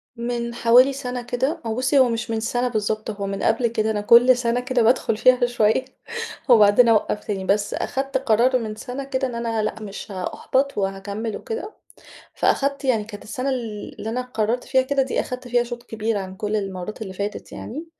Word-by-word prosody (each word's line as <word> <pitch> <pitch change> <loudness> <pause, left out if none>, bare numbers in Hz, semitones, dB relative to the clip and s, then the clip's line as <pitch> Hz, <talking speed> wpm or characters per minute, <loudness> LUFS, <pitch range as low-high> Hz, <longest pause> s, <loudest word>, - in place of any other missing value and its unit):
من 235 0 -3
حوالي 245 +4 +5
سنة 250 -2 -4
كده، 260 +7 -2
هو 220 - -2
بُصّي، 265 +3 +2
هو 255 -2 +5
مش 230 0 -3
من 225 - 0
سَنة 245 +3 0
بالضبط، 215 -2 -2
هو 200 -1 -5
من 195 0 -4
قبل 235 +2 +2
كده 220 -1 0
أنا 210 -1 -1
كل 240 +4 +6
سنة 240 0 0
كده 250 -1 0
بادخل 225 -1 +2
فيها 250 +1 +5
شوية، 240 +1 +2 0.6
وبعدين 220 +1 +6
أوقّف 210 -1 +2
تاني. 195 -3 -3
بس 205 +1 +1
أخدت 270 +1 -2
قرار 255 0 +3
من 215 -2 -5
سَنة 250 +5 -6
كده، 265 -1 -1
إن 245 - -6
أنا 230 -2 -1
لأ 220 +1 -3
مش 205 0 -8
هأُحبط 260 +8 -1
وهاكمّل 200 +3 -3
وكده. 450 -2 -6 0.6
فأخدت 280 0 +1
يعني 230 -5 +2
كانت 205 -1 -10
السَنة 255 +5 -3
ال 230 -5 -5
اللي 220 - -4
أنا 245 +2 -1
قررت 240 -1 -1
فيها 260 -1 +3
كده 270 +1 +1
دي، 260 - -1
أخدت 250 0 -6
فيها 245 0 +3
شوط 240 0 -7
كبير 225 -2 -2
عن 190 -1 -6
كل 210 +2 -2
المرّات 195 +1 -5
اللي 190 -3 -6
فاتت 200 +2 -5
يعني. 305 +8 -7
235 Hz, 195 wpm, -22 LUFS, 215-255 Hz, 0.6 s, كل